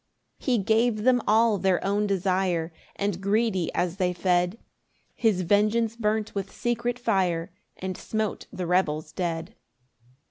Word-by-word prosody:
6 - - -17
He 250 -2 +4
gave 220 +1 +2
them 250 0 +4
all 220 -1 +4
their 185 0 +1
own 205 +1 +1
desire; 185 -3 0 0.2
And 200 -2 -2
greedy 200 -3 +1
as 180 +1 -1
they 180 -2 +1
fed, 180 +2 +1 0.6
His 210 -6 +1
vengeance 215 +4 +2
burnt 215 -1 -1
with 195 -1 -4
secret 240 0 -1
fire, 185 -8 0 0.3
And 190 0 -4
smote 220 +1 -3
the 180 - -4
rebels 155 -4 0
dead. 170 +2 -3
195 Hz, 140 wpm, -26 LUFS, 180-220 Hz, 0.6 s, He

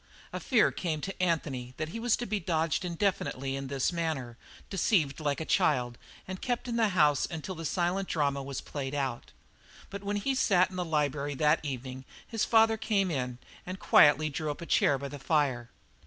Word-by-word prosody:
A - - -3
fear 245 -5 +3
came 160 -4 -2
to 195 +1 -5
Anthony 135 -8 -1
that 155 0 -3
he 230 - -6
was 235 0 +2
to 240 - -4
be 210 -1 -1
dodged 165 -2 0
indefinitely 170 -7 -1
in 135 0 -4
this 135 +4 0
manner, 155 -8 -2 0.3
deceived 175 -7 +1
like 145 -2 -1
a 160 - -3
child, 125 -6 +1 0.3
and 185 0 -6
kept 245 0 -2
in 235 - -2
the 230 -2 +3
house 150 -3 +4
until 160 +3 -5
the 165 -2 -7
silent 180 +4 0
drama 140 -3 0
was 135 0 -5
played 140 -1 -5
out. 135 -4 -3 0.6
But 200 0 -6
when 205 +1 -2
he 270 +7 0
sat 185 -7 +3
in - - -9
the 180 - -1
library 145 -3 -1
that 150 +2 +2
evening 130 -2 -5 0.2
his 225 -2 -1
father 225 -1 +4
came 200 -4 +1
in 125 -4 -2 0.3
and 185 +1 -6
quietly 155 +1 +5
drew 155 +2 -3
up 145 - -5
a - - -5
chair 145 -2 +3
by 140 +1 -5
the 145 - -8
fire. 135 -5 0
155 Hz, 200 wpm, -30 LUFS, 140-190 Hz, 0.6 s, quietly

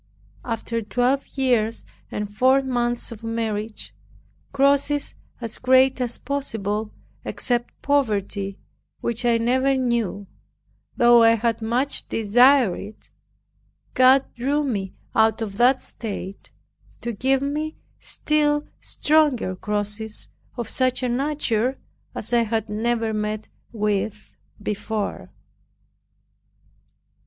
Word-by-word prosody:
After 230 0 -3
twelve 250 +5 0
years 235 -4 +1 0.2
and 205 0 -5
four 260 +3 +4
months 240 -2 -1
of 225 -1 -9
marriage, 225 -1 -3 0.6
crosses 280 +1 +2 0.3
as 230 -2 -5
great 260 0 +4
as 245 -1 +1
possible, 220 -6 -3 0.3
except 240 -1 -2
poverty 205 -8 0 0.4
which 235 +1 -2
I 235 -1 +4
never 260 +4 +2
knew, 235 -6 -1 0.7
though 240 0 +7
I 230 0 +6
had 230 0 -1
much 245 +5 0
desired 245 0 +4
it, 210 +2 -11 0.8
God 260 +1 +6
drew 280 +5 0
me 200 -9 -3 0.2
out 220 0 +3
of 205 -3 -5
that 250 +3 +4
state 200 -3 -6 0.5
to 235 - -3
give 265 +5 +1
me 305 +2 -3 0.2
still 295 -1 0
stronger 295 -11 +1
crosses 210 +2 -4 0.3
of 235 -3 -3
such 255 +2 0
a 250 - +1
nature 260 -2 0 0.4
as - - -2
I 240 - +5
had 225 -1 -1
never 225 +1 0
met 215 0 -3 0.2
with 210 -1 -2 0.2
before. 210 0 -3
235 Hz, 110 wpm, -23 LUFS, 215-260 Hz, 0.8 s, though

